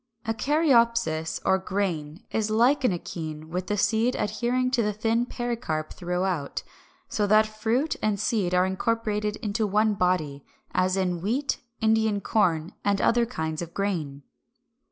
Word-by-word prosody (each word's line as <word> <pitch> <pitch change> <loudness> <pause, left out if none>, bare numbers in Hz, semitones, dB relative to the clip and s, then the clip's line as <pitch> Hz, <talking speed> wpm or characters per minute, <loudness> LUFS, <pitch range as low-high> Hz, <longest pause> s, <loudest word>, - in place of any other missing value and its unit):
=A 225 - 0
Caryopsis, 230 - +2
or 190 0 +3
Grain=, 180 -5 -3
is 220 -1 0
like 240 +6 +3
an 250 - +4
akene 160 -3 -5
with 180 +2 -3
the 210 - -1
seed 220 +5 +2
adhering 240 +4 0
to 250 -2 +2
the 210 -1 0
thin 225 +3 0
pericarp 230 -13 -3
throughout, 180 -4 -2 0.4
so 205 -1 0
that 215 +1 +5
fruit 225 +7 -1
and 210 -2 0
seed 185 -6 0
are 180 0 +4
incorporated 210 +1 -1
into 215 +1 0
one 210 +2 +2
body; 170 -7 0 0.3
as 185 +1 +2
in 180 -3 0
wheat, 250 +9 -1 0.2
Indian 220 -1 +2
corn, 175 -6 +1
and 200 -1 +2
other 235 +2 +3
kinds 160 -9 -3
of 170 0 -7
grain. 160 -9 -2
205 Hz, 150 wpm, -26 LUFS, 180-225 Hz, 0.4 s, that